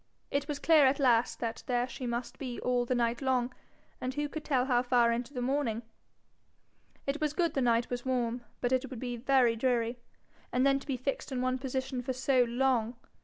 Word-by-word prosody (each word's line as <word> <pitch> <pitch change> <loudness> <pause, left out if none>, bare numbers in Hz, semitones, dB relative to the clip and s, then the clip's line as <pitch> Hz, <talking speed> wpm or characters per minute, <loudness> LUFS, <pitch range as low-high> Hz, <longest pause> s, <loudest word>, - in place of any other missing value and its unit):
It 280 0 0
was 295 -2 -2
clear 300 -1 +5
at 270 +1 +2
last 245 -4 +3
that 230 -1 -3
there 245 0 +1
she 255 -1 -6
must 235 +1 -4
be 250 -3 -5
all 245 -1 +1
the 255 - 0
night 235 +1 0
long, 255 -2 +1 0.5
and 255 +1 -3
who 295 0 -1
could 310 +1 -6
tell 255 -4 +1
how 245 -2 +3
far 245 -2 +3
into 235 +2 -2
the 250 -3 -3
morning? 245 -4 0 1.2
It 280 +3 -2
was 300 -1 0
good 335 -2 +1
the 270 - 0
night 235 -1 +2
was 245 0 -3
warm, 245 -2 -1 0.2
but 245 - 0
it 260 0 +1
would 255 - -7
be 245 -1 -3
very 245 -1 +3
dreary. 240 0 0 0.5
And 255 +2 +2
then 275 0 +4
to - - -14
be 270 -3 -1
fixed 275 +3 -3
in 260 - -2
one 255 0 0
position 260 -1 -3
for 260 +1 -3
so 255 0 +3
long! 240 -1 +1
255 Hz, 215 wpm, -31 LUFS, 240-270 Hz, 1.2 s, clear